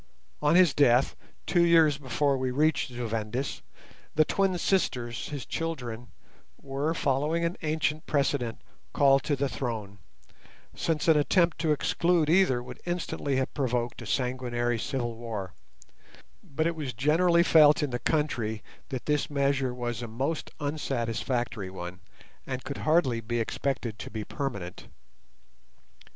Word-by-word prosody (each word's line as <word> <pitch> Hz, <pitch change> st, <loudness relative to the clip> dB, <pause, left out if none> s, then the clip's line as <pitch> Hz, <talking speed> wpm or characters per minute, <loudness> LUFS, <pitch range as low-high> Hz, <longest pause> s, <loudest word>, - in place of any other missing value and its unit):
On 150 Hz, +2 st, +3 dB
his 180 Hz, -5 st, +6 dB
death, 130 Hz, -2 st, +4 dB, 0.3 s
two 175 Hz, -2 st, +3 dB
years 160 Hz, -4 st, +5 dB
before 140 Hz, +1 st, +1 dB
we 130 Hz, -1 st, -1 dB
reached 150 Hz, +5 st, +2 dB
Zu 120 Hz, -1 st, -4 dB
Vendis, 115 Hz, +4 st, -3 dB, 0.5 s
the 155 Hz, -, +5 dB
twin 195 Hz, 0 st, +1 dB
sisters, 125 Hz, -, -1 dB
his 145 Hz, -3 st, -5 dB
children, 125 Hz, -8 st, -4 dB, 0.5 s
were, 140 Hz, +4 st, -2 dB
following 150 Hz, +4 st, +1 dB
an 170 Hz, +2 st, -1 dB
ancient 155 Hz, 0 st, -1 dB
precedent, 140 Hz, -5 st, 0 dB, 0.3 s
called 135 Hz, -1 st, +5 dB
to 145 Hz, -, 0 dB
the 140 Hz, +1 st, 0 dB
throne, 110 Hz, -7 st, -4 dB, 0.7 s
since 160 Hz, -1 st, -1 dB
an 160 Hz, -2 st, +6 dB
attempt 170 Hz, +3 st, +2 dB
to 160 Hz, -1 st, +1 dB
exclude 165 Hz, +1 st, +2 dB
either 165 Hz, -10 st, +4 dB
would -, -, -10 dB
instantly 175 Hz, -5 st, -2 dB
have 130 Hz, 0 st, -1 dB
provoked 125 Hz, -4 st, -1 dB
a 120 Hz, -, -8 dB
sanguinary 120 Hz, -1 st, -1 dB
civil 120 Hz, -1 st, -2 dB
war; 110 Hz, -6 st, -5 dB, 0.9 s
but 155 Hz, +3 st, -2 dB
it 170 Hz, 0 st, 0 dB
was 145 Hz, -5 st, -4 dB
generally 170 Hz, +7 st, +3 dB
felt 150 Hz, -3 st, +6 dB
in 145 Hz, -, -1 dB
the 120 Hz, -, -2 dB
country 120 Hz, -9 st, -1 dB, 0.3 s
that 130 Hz, -4 st, -5 dB
this 150 Hz, -1 st, 0 dB
measure 140 Hz, -2 st, +1 dB
was 120 Hz, -1 st, -4 dB
a 120 Hz, -, -4 dB
most 135 Hz, +8 st, -3 dB
unsatisfactory 120 Hz, -6 st, -2 dB
one, 90 Hz, -1 st, -7 dB, 0.5 s
and 130 Hz, -1 st, -4 dB
could 140 Hz, -, -5 dB
hardly 155 Hz, -7 st, +2 dB
be 120 Hz, +2 st, -2 dB
expected 115 Hz, -1 st, -2 dB
to -, -, -6 dB
be 110 Hz, 0 st, -5 dB
permanent. 100 Hz, -10 st, -5 dB
135 Hz, 140 wpm, -28 LUFS, 120-155 Hz, 0.9 s, his